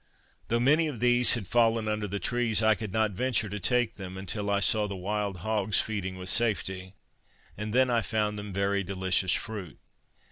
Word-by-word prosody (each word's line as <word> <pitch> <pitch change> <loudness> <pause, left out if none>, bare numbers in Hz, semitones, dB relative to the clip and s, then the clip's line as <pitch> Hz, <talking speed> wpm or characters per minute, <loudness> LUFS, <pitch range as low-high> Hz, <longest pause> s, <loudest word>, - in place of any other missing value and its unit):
Though 115 - +1
many 150 +6 +3
of 140 -7 -5
these 120 0 +3
had 115 -5 -3
fallen 115 0 +2
under 105 -1 -1
the 100 +1 -3
trees, 115 +2 0
I 110 0 +5
could 110 -1 -6
not 110 +1 +1
venture 110 +1 0
to 105 +2 -4
take 120 +4 +1
them, 95 -1 -7
until 100 +2 -3
I 100 0 +2
saw 105 +1 +3
the 100 - -5
wild 100 +1 -3
hogs 110 -2 +2
feeding 95 -4 -3
with 90 0 -7
safety, 95 -5 -1 0.6
and 105 +1 -5
then 130 +2 +3
I 115 -1 +2
found 105 -1 -1
them 105 -1 -7
very 100 +1 0
delicious 95 -1 0
fruit. 100 -8 -5
105 Hz, 190 wpm, -28 LUFS, 100-115 Hz, 0.6 s, I